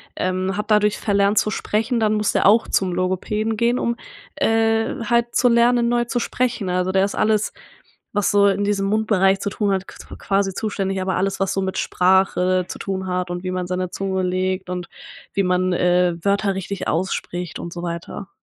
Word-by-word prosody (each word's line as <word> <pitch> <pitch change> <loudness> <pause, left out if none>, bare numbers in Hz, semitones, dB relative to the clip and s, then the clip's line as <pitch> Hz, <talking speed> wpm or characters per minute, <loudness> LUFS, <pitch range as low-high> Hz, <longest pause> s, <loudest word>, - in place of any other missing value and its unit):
ähm, 185 +1 -1
hat 210 +1 -4
dadurch 210 0 +3
verlernt 200 0 +2
zu 215 - 0
sprechen, 225 +4 -1
dann 215 -1 +2
muss 210 -1 +1
der - - +1
auch 220 +3 +5
zum 185 -2 0
Logopäden 210 +4 -1
gehen, 235 +2 +2
um, 235 0 0 0.4
äh, 225 +1 +1
halt 235 0 +1
zu 250 - +4
lernen, 235 0 +3
neu 240 0 +1
zu 240 +1 -1
sprechen. 235 -6 -1
Also, 180 +1 0
der 190 0 +3
ist 200 - -4
alles, 215 -1 +1 0.6
was 205 -2 +1
so 200 0 +5
in 200 +1 0
diesem 200 -1 0
Mundbereich 200 -3 +2
zu 200 - -3
tun 205 0 -1
hat, 190 0 -1
qu - - -12 0.2
quasi 195 -1 0
zuständig, 195 -3 -2
aber 190 0 -1
alles, 195 +1 -1
was 195 0 0
so 195 - -1
mit 190 0 -3
Sprache 185 0 +2
zu - - -8
tun 190 -1 -3
hat 180 -1 -2
und 175 +1 -5
wie 185 - -2
man 180 -1 -3
seine 180 -1 -2
Zunge 190 -1 -2
legt 185 0 -1
und 180 -1 -4 0.5
wie 195 - +1
man, 180 0 +1
äh, 180 0 +2
Wörter 200 +1 +1
richtig 195 +1 -4
ausspricht 175 0 -3
und 170 - -7
so 175 0 -6
weiter. 170 +3 -6
195 Hz, 200 wpm, -21 LUFS, 185-215 Hz, 0.6 s, auch